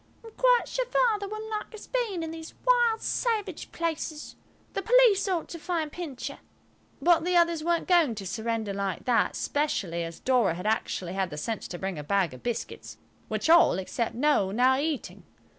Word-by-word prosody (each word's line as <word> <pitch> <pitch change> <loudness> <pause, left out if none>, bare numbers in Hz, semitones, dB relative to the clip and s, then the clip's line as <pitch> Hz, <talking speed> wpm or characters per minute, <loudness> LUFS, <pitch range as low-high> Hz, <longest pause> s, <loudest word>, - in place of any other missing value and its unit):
"I'm 450 - -10
quite - - +3
sure - - -2
Father 445 -5 +1
wouldn't 430 +2 -6
like 430 +1 -4
us 425 - -10
being 445 -9 -2
in 320 - -4
these 325 0 -9
wild, 480 -3 +3
savage 420 -7 -2
places. 320 -2 -4 0.4
The - - -2
police 460 -2 +5
ought 360 -4 -1
to 335 - -7
find 320 -2 -2
Pincher." 305 -7 -6 0.6
But 340 -2 +4
the 360 +1 0
others 335 -2 +2
weren't 340 0 0
going 335 -10 +4
to 200 -2 -6
surrender 220 +1 -2
like 195 -3 -3
that, 245 -2 +2
especially 195 - -1
as 165 0 -7
Dora 245 -10 +2
had 180 +3 -7
actually 195 -4 -1
had 190 -1 -1
the 150 - -7
sense 220 +8 -3
to 175 - -6
bring 190 -3 -4
a - - -5
bag 190 -1 +1
of 130 - -11
biscuits, 240 -2 -5 0.3
which - - -2
all, 330 - +6
except 225 +5 -3
Noël, 290 -9 +3
were 190 - -5
now 255 +3 +4
eating. 300 -2 -3
310 Hz, 190 wpm, -27 LUFS, -, 0.6 s, all